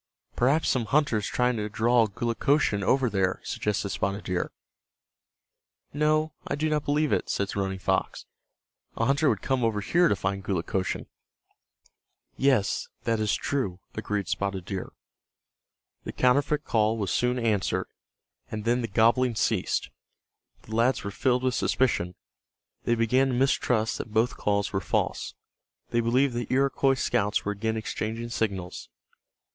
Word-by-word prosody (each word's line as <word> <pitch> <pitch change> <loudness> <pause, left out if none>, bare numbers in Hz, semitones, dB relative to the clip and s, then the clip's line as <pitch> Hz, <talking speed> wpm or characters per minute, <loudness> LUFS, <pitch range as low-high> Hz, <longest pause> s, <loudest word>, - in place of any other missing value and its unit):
"Perhaps 140 +6 +2
some 125 -4 +1
hunter 140 -2 +2
is 105 - -2
trying 125 -1 +1
to 105 0 -3
draw 115 +2 +3
Gulukochsun 115 +1 +1
over 130 +6 +3
there," 95 -3 0
suggested 105 -1 -2
Spotted 100 +2 -2
Deer. 90 -1 -2 1.4
"No, 155 +1 +1
I - - -1
do 155 +2 0
not 150 -1 0
believe 150 0 +1
it," - - 0
said 100 0 -1
Running 95 -1 -1
Fox. 95 - -1 0.7
"A 115 - +1
hunter 140 +3 +3
would - - -1
come 130 -2 0
over 110 -2 +1
here 175 - +3
to 100 - +2
find 95 +1 -2
Gulukochsun." 95 0 -2 1.3
"Yes, 130 -7 +2 0.2
that 115 -1 0
is 105 -1 +1
true," 120 -11 -2
agreed 105 -3 -3
Spotted 95 -2 -2
Deer. 95 -1 -5 1.1
The - - -5
counterfeit 145 +4 +2
call 110 0 +2
was 100 -3 -2
soon 125 +1 +1
answered, 110 -5 0 0.6
and 110 0 -5
then 120 +2 +2
the 115 - -2
gobbling 115 +3 +3
ceased. 110 -3 0 0.7
The 110 - -7
lads 120 +2 +2
were 100 - -4
filled 125 +4 +1
with 130 -1 +1
suspicion. 90 -11 +1 0.7
They 120 - +3
began 125 +4 +3
to 130 - -1
mistrust 125 -3 +1
that 115 - -6
both 110 +2 +1
calls 100 0 0
were 95 - 0
false. - - -1 0.6
They 120 - +2
believed 125 +3 +2
that 120 -3 -3
Iroquois 135 0 +2
scouts 105 -5 0
were 105 - 0
again 110 +2 -2
exchanging 110 +1 -4
signals. 100 -6 -3
115 Hz, 150 wpm, -27 LUFS, 100-130 Hz, 1.4 s, draw